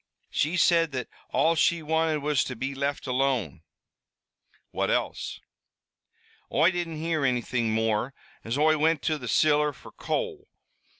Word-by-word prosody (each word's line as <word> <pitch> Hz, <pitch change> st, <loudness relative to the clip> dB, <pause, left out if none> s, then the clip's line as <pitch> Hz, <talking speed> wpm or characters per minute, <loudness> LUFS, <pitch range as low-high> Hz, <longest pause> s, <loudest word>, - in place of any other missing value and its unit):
"She 160 Hz, +5 st, 0 dB
said 165 Hz, -3 st, +3 dB
that 125 Hz, -2 st, -4 dB, 0.2 s
all 165 Hz, -, +3 dB
she 165 Hz, 0 st, +2 dB
wanted 160 Hz, -1 st, 0 dB
was 150 Hz, -2 st, +2 dB
to 130 Hz, -, -5 dB
be 130 Hz, +4 st, -3 dB
left 140 Hz, +1 st, -2 dB
alone." 125 Hz, -, 0 dB, 1.1 s
"What -, -, -1 dB
else?" -, -, -2 dB, 1.1 s
"Oi 160 Hz, +6 st, +4 dB
didn't 170 Hz, -3 st, -3 dB
hear 160 Hz, -1 st, -1 dB
anything 120 Hz, -3 st, 0 dB
more, 110 Hz, +4 st, 0 dB, 0.3 s
as 115 Hz, +4 st, -2 dB
Oi 155 Hz, +1 st, +3 dB
wint 160 Hz, -1 st, +2 dB
to 155 Hz, -1 st, 0 dB
the 125 Hz, -, -7 dB
ciller 150 Hz, +3 st, +3 dB
fer -, -, -14 dB
coal. 435 Hz, -4 st, -3 dB
150 Hz, 140 wpm, -27 LUFS, 130-160 Hz, 1.1 s, Oi